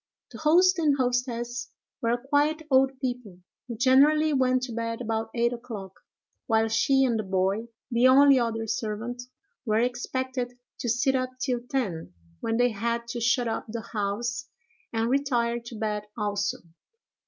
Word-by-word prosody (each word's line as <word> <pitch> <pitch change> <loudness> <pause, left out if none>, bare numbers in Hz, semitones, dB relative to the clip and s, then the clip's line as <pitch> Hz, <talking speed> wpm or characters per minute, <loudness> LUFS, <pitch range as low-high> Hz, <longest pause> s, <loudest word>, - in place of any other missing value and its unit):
The - - -10
host 355 +4 +4
and 295 -4 +3
hostess 245 -1 -1 0.3
were 235 +1 +1
quiet 290 +5 +1
old 265 0 +3
people, 245 -8 -4 0.3
who 235 -2 -6
generally 290 +5 +4
went 255 -1 +2
to 255 - -4
bed 230 0 -3
about 225 -2 -2
eight 235 0 +2
o'clock, 225 -6 -7 0.5
while 225 -1 +3
she 270 +4 +3
and 235 -3 +1
the - - -1
boy, 195 +3 0 0.2
the 240 +2 +5
only 275 +1 +7
other 225 -1 -1
servant, 225 +2 -3 0.4
were 215 -3 +1
expected 250 +1 -2 0.2
to 240 - -2
sit 250 +4 +2
up 255 -1 0
till 245 -1 0
ten, 190 - -2 0.3
when 225 0 -1
they 245 0 +4
had 235 +2 -2
to 240 0 -4
shut 245 +1 +2
up 225 - -3
the 225 0 -6
house 235 +6 -2 0.4
and 225 0 0
retire 240 -3 +1
to 235 0 -10
bed 210 -1 -3
also. 205 -2 -1
240 Hz, 155 wpm, -27 LUFS, 225-260 Hz, 0.5 s, only